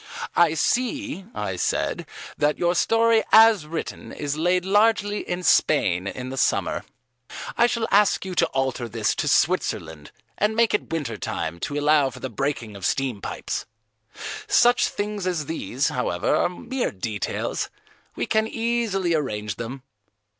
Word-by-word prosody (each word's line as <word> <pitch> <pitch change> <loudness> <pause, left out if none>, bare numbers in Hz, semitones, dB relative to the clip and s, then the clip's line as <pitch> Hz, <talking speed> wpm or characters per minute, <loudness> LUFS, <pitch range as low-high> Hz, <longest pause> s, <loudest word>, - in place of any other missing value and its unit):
"I 165 -2 +4
see," 255 - -1
I 95 -3 -3
said, - - -1 0.3
"that 150 +1 +1
your 175 0 +2
story 225 +4 +3
as 220 -7 +7
written 165 +1 -5
is 145 -1 -3
laid 180 +3 +1
largely 205 +1 +3
in 180 +1 -2
Spain 95 - +3
in 125 +5 -5
the 135 - -6
summer. - - 0 0.7
I 235 - +5
shall 235 -2 -1
ask 205 -1 +4
you 190 - -4
to - - +3
alter 130 -3 -2
this 110 -1 0
to - - -2
Switzerland 80 -2 0 0.3
and 210 +1 +1
make 230 -1 +3
it 210 - -1
winter 145 -9 -3
time 85 -2 -4
to 145 +11 -3
allow 145 -1 +3
for - - -11
the 130 - -5
breaking 120 -4 -3
of 100 - -10
steam 130 -2 -1
pipes. - - -4 0.8
Such 245 -11 +4
things 205 -2 -3
as 170 -5 -1
these, 140 -3 -1
however, 90 -9 0
are - - +2
mere 255 +8 -3
details; 105 +1 -3 0.5
we - - -1
can 220 0 +1
easily 225 -6 0
arrange 105 -9 -2
them." 125 +3 -6
160 Hz, 155 wpm, -24 LUFS, -, 0.8 s, as